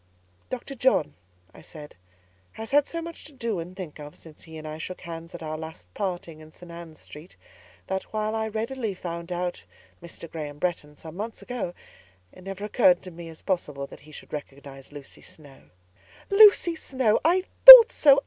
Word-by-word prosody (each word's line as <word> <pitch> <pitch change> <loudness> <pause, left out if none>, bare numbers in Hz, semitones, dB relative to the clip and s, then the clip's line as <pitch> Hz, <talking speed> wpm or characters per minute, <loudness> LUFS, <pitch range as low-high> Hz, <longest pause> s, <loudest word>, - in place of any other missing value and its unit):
"Dr. 255 +2 -7
John," 255 - 0 0.4
I - - -15
said, 150 -2 -13 0.6
"has 220 +2 -9
had 290 0 +3
so 335 0 -6
much 335 0 -10
to 305 - -13
do 230 -7 -4
and 175 +3 -9
think 170 -6 -9
of, 150 0 -11
since 160 -2 -16
he 160 -1 -12
and 155 0 -9
I 155 +1 -8
shook 185 +3 -8
hands 165 -1 -10
at 170 - -9
our 155 0 -6
last 160 - -11
parting 175 -5 -5
in 155 0 -15
St. 175 +1 -15
Ann's 170 -2 -11
Street, 155 +5 -14 0.5
that, 190 0 -3
while 215 0 -3
I 220 0 -2
readily 225 0 -4
found 170 -1 -8
out 175 0 -4 0.4
Mr. 170 0 -11
Graham 150 -3 -8
Bretton, 150 -3 -4
some 160 0 -12
months 220 +4 -7
ago, 235 -8 -6 0.6
it 185 - -17
never 195 +1 -7
occurred 190 -5 +2
to 185 - -10
me 170 0 -11
as 160 - -14
possible 150 -7 -3
that - - -14
he 155 - -18
should - - -14
recognise 140 -2 -10
Lucy 145 -2 -13
Snowe." 145 -4 -16 0.6
"Lucy 400 -4 +5
Snowe! 255 -8 -1
I 360 +3 +2 0.2
thought - - +14
so! 280 -2 +4
175 Hz, 185 wpm, -24 LUFS, 155-220 Hz, 0.6 s, thought